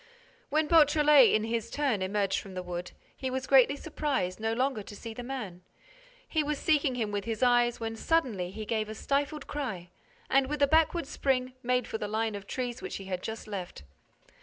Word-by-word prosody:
When 310 +1 +2
Beautrelet, 300 -4 +6
in 215 - +2
his 230 0 -2
turn, 270 -9 0
emerged 195 +1 0
from 195 -2 -10
the 185 - -4
wood, 175 0 -5 0.3
he 260 - -3
was 260 0 -3
greatly 270 +1 +5
surprised 280 - -2
no 220 0 -1
longer 255 -1 0
to 205 - -10
see 225 +2 -7
the 245 - -7
man. 240 -9 -6 0.7
He 315 - +1
was 300 0 -1
seeking 290 -4 +2
him 220 -4 -2
with 205 -1 -3
his 225 +1 -2
eyes 240 -1 +3
when, 225 0 -3
suddenly, 225 - 0
he 215 +3 -7
gave 215 0 -1
a 215 - -6
stifled 285 +4 -1
cry 215 -12 -5 0.4
and, 270 0 +3
with 295 0 0
a - - +6
backward 320 +2 +3
spring, 255 -2 -1
made 250 -1 +1
for 220 - -4
the 210 - -3
line 220 +1 -1
of 200 -1 -7
trees 250 -1 -4
which - - -5
he 195 - -7
had 185 -1 -3
just 220 +2 -6
left. 185 - -6
240 Hz, 205 wpm, -29 LUFS, 210-280 Hz, 0.7 s, Beautrelet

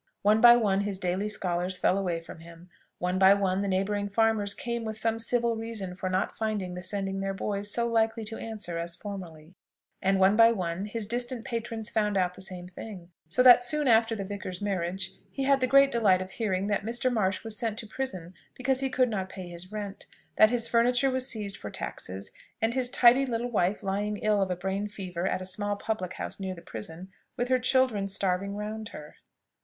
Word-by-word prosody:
One 210 +2 +4
by 240 0 +10
one 200 -4 +2
his 200 -1 -2
daily 185 +3 -1
scholars 180 -2 -1
fell 185 - +2
away 180 -4 -1
from 165 0 -11
him, 170 +2 -14 0.3
one 180 +1 -1
by 190 +1 +7
one 195 -1 0
the 200 - -1
neighbouring 200 +2 0
farmers 210 -1 +1
came 235 -4 -3
with 220 -1 -4
some 225 +1 0
civil 235 0 +1
reason 225 -5 -5
for 185 0 -4
not 185 +1 -1
finding 210 -5 -2
the 180 - -6
sending 195 +1 -3
their 195 0 -2
boys 205 +1 -3
so 235 +2 0
likely 225 0 +1
to 225 +1 -5
answer 210 -7 -4
as 170 0 -4
formerly; 175 -4 -8 0.5
and 195 0 +2
one 190 +2 +5
by 230 +1 +7
one 180 -1 -3
his 210 +1 -3
distant 240 +1 -3
patrons 230 -1 -4
found 210 -2 +1
out 180 -1 +1
the - - -11
same 180 -1 -4
thing: 180 -1 -10 0.2
so 175 +10 +2
that 245 -1 +9
soon 300 +3 +1
after 225 -1 +4
the 200 - -4
vicar's 190 -2 -6
marriage 190 -2 -2 0.2
he 275 - -4
had 275 0 +4
the 255 - +1
great 275 +1 +6
delight 210 -7 +4
of 185 0 -6
hearing 195 -4 -1
that 205 0 0
Mr. 240 +3 0
Marsh 195 -4 0
was 225 -1 -4
sent 225 -1 -2
to 230 - -5
prison 190 -8 -5 0.2
because 260 0 +1
he 270 0 0
could 255 -1 +2
not 195 -5 -3
pay 185 -2 -8
his 175 +2 -8
rent, 205 -2 -6 0.3
that 215 - +7
his 235 -1 +2
furniture 245 +3 +3
was 260 0 0
seized 205 -5 -3
for 105 - -7
taxes, 95 0 -6 0.3
and 225 0 +1
his 255 -1 +1
tidy 250 +2 +6
little 240 0 -2
wife 200 -1 +1
lying 205 +2 -1
ill 210 -1 +1
of 190 - 0
a 180 - 0
brain 190 +3 -2
fever 185 -3 -4
at 185 - -1
a - - -7
small 205 +2 -2
public 205 -3 -3
house - - -6
near 190 -1 -4
the 170 - -11
prison, 165 - -8 0.3
with 245 +1 -1
her 255 0 +3
children 250 -5 +2
starving 195 0 -1
round 215 +1 -5
her. 150 - -11
205 Hz, 215 wpm, -28 LUFS, 185-230 Hz, 0.5 s, by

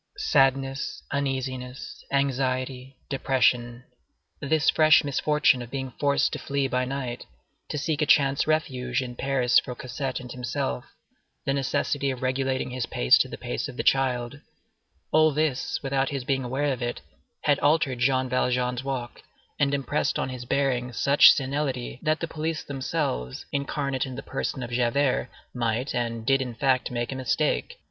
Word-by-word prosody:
Sadness, 135 - +1
uneasiness, 130 -2 -3
anxiety, 130 -1 -1
depression, 125 -3 +1 0.6
this 155 +2 +1
fresh 155 0 +6
misfortune 145 -2 +2
of 120 - -8
being 130 0 -4
forced 140 -1 +2
to - - -3
flee 140 -1 -1
by 125 0 0
night, 130 -2 -4 0.4
to - - -3
seek 150 +1 -1
a 150 - +2
chance 140 -5 +4
refuge 130 -5 0
in 125 -1 -7
Paris 130 -2 +3
for 125 - -7
Cosette 130 +1 -4
and 125 -1 -9
himself, 110 - -3 0.6
the 135 - +1
necessity 140 +1 0
of 130 -1 -4
regulating 130 0 -1
his 125 -1 -3
pace - - +4
to - - +2
the - - -8
pace - - -3
of - - -10
the - - -1
child—all 135 - 0
this, 150 -3 0
without 135 0 0
his 140 -3 -3
being 135 0 0
aware 135 +3 0
of 125 - -7
it, 120 0 -2 0.4
had 145 -2 +3
altered 145 -4 +2
Jean 130 +1 +2
Valjean's 125 0 0
walk, 130 -3 -4 0.4
and 140 -1 +3
impressed 140 +1 0
on - - -1
his 125 -1 -6
bearing 125 -2 0
such 140 +5 +7
senility, 135 -3 -2
that 155 0 +1
the 165 - -1
police 160 0 -3
themselves, 65 - -3
incarnate 140 -1 -1
in 130 - -7
the 135 - -7
person 130 -1 -3
of 120 - -6
Javert, 125 +1 +1 0.2
might, 120 +2 -1
and 115 -2 -2
did 135 +2 +3
in 125 -3 -4
fact, 130 -1 +1
make 120 0 -3
a - - -4
mistake. 150 - -1
130 Hz, 160 wpm, -26 LUFS, 125-140 Hz, 0.6 s, such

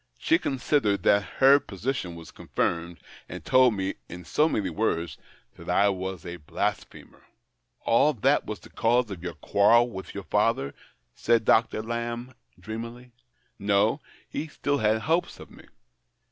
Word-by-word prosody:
He 320 - +2
considered 125 -7 0
that 100 0 +4 0.2
her 135 +2 +7
position 110 -5 -4
was 85 -1 -11
confirmed, 85 0 -2 0.3
and - - -8
told 130 -3 +5
me, 95 0 -2 0.2
in 90 0 -9
so 155 - +2
many 95 - -1
words, 85 -4 -2 0.4
that - - -10
I 100 +1 +4
was 95 -2 -4
a 85 0 -6
blasphemer." 75 -3 -5 0.3
" - - -41
And 135 +2 +3
that - - +4
was - - -5
the - - -15
cause 120 -1 +1
of 90 -4 -7
your 85 -2 -5
quarrel 115 - +3
with 95 -2 -8
your 100 - -5
father? 105 -9 0 0.2
" - - -47
said 115 - +1
Dr. 110 -1 +3
Lamb, 120 +2 -4 0.3
dreamily. 115 +5 -8 0.3
'' - - -43
No, 100 - +2 0.3
he 160 - -4
still 145 -2 -2
had 110 +1 +2
hopes 165 +6 -1
of - - -12
me. - - -15
110 Hz, 160 wpm, -26 LUFS, 90-120 Hz, 0.4 s, her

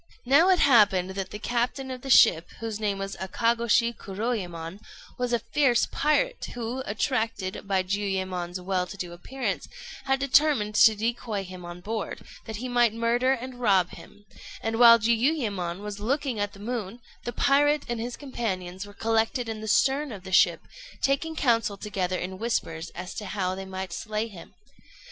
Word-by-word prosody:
] - - -35
Now 285 +8 +5
it 370 - +5
happened 205 - +4
that 190 0 -4
the - - -6
captain 245 +4 -2
of 255 -1 -6
the 270 - -7
ship, 165 -8 +6
whose 225 -2 -4
name 205 -2 -1
was 195 0 -4
Akagôshi 230 +4 +1
Kuroyémon, 190 -5 -4 0.4
was 250 -1 -1
a 240 - +3 0.2
fierce 275 -5 +4
pirate 485 - +1
who, 240 +2 -4
attracted 220 -4 -2
by 190 -2 +1
Jiuyémon's 185 -2 -2
well 180 0 -1
to 200 - -9
do 175 -2 -5
appearance, 260 +10 -4 0.4
had 270 0 +1
determined 275 -5 +3
to 220 +1 +6
decoy 225 -1 -2
him 185 -1 -10
on 175 +1 -8
board, 215 +1 -4 0.2
that 220 - -6
he 245 +5 -4
might 240 -3 +3
murder 240 +3 +2
and 255 0 -6
rob 195 -7 +3
him; 205 0 -14 0.4
and 225 0 -1
while 235 -1 +9
Jiuyémon 225 - 0
was 205 -1 -6
looking 260 +1 -1
at 205 0 -2
the 200 - -13
moon, 230 0 -4 0.2
the 240 - -3
pirate 290 +3 +3
and 240 -2 -3
his 240 +1 -4
companions 195 -8 -4
were 205 - -14
collected 225 +2 0
in 220 -1 -5
the 220 - -6
stern 270 +6 +2
of 200 -4 -8
the 190 - -9
ship, 185 - +4 0.4
taking 285 +4 +1
counsel 230 -8 +1
together 185 -3 -2
in 185 +1 -5
whispers 170 -8 -2
as 180 +1 -6
to 210 - -6
how 185 -2 -2
they 190 +1 -6
might 190 -1 -6
slay 215 +4 -3
him. 190 -7 -13
220 Hz, 175 wpm, -26 LUFS, 190-245 Hz, 0.4 s, while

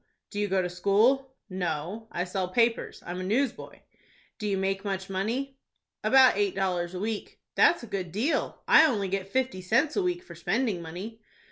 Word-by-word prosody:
"Do 205 - -4
you 205 - +1
go 190 -1 +1
to - - -1
school?" 220 +9 +2
"No, 185 +3 -4
I 175 - -1
sell 185 0 -2
papers. 230 +5 0
I'm 175 +1 -5
a - - -3
newsboy." 240 +7 -2 0.6
"Do 210 - -3
you 200 -1 0
make 195 0 -1
much 195 -1 -3
money?" 250 +8 -2 0.4
"About 265 -1 +6
eight 200 -1 0
dollars 180 -2 -1
a - - -4
week." 215 +1 -4
"That's 340 - +4
a - - -5
good 190 -5 -4
deal. 230 - -1
I - - +8
only 205 -8 -1
get 195 0 -2
fifty 255 -5 -1
cents 250 - +2
a 405 - +2
week 360 -1 -1
for - - -11
spending 225 -7 -1
money." 190 +8 -8
200 Hz, 190 wpm, -28 LUFS, 185-245 Hz, 0.6 s, I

